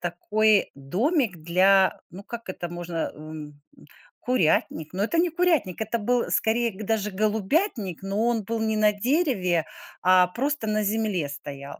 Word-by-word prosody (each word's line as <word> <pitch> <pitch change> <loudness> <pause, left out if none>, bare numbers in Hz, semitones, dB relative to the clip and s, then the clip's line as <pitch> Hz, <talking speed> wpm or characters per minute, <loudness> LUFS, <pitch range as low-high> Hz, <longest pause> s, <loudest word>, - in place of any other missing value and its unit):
такой 210 +4 +1
домик 210 - 0
для, 185 +4 +3
ну, 195 +3 -10
как 230 -1 -8
это 175 -1 -5
можно, 175 -1 -4
м, 155 +1 -10
м 145 0 -17 0.6
курятник. 160 -8 0
Но 195 +2 -1
это 330 +10 -1
не 345 +1 +3
курятник, 325 - 0
это 220 +2 -1
был 245 +3 0
скорее 235 +2 +1
г 195 +3 -9
даже 210 -1 0
голубятник, 215 - -1
но 205 +4 0
он 230 -3 0
был 225 +3 -3
не 220 -1 0
на 210 0 +4
дереве, 205 - +1 0.4
а 185 0 +5
просто 265 +4 -2
на 215 0 0
земле 205 -7 -1
стоял. 140 0 -8
210 Hz, 160 wpm, -25 LUFS, 180-230 Hz, 0.6 s, а